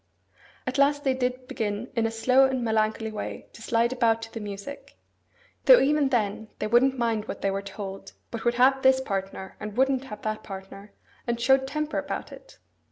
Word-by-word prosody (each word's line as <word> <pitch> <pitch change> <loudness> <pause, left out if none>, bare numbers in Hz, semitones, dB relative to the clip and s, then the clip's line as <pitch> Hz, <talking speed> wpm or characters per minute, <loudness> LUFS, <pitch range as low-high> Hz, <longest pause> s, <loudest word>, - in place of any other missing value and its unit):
At 255 +2 -2
last 290 +1 +3
they 265 - +2
did 255 0 -2
begin 210 +2 -3
in 225 -1 +2
a - - -2
slow 255 +4 +4
and 260 -2 -1
melancholy 220 0 0
way 215 - -6
to - - -13
slide 235 +2 +1
about 230 -3 +2
to 225 - -9
the 225 - -5
music; 205 +6 -8 0.7
though - - +9
even 290 0 +3
then 220 -3 0
they - - -3
wouldn't 250 +4 +3
mind 225 -3 0
what - - -6
they 195 - +2
were 195 +1 -2
told, 195 -1 -8 0.2
but 230 - -5
would 240 0 +2
have 265 +2 +4
this 265 0 +5
partner, 195 -5 -4
and 210 +1 -7
wouldn't 265 0 +2
have 210 -4 -9
that 215 0 -2
partner, 195 +1 -9 0.4
and 235 0 -1
showed 265 +2 +3
temper 305 +2 -2
about - - -5
it. - - -14
235 Hz, 195 wpm, -26 LUFS, 210-265 Hz, 0.7 s, though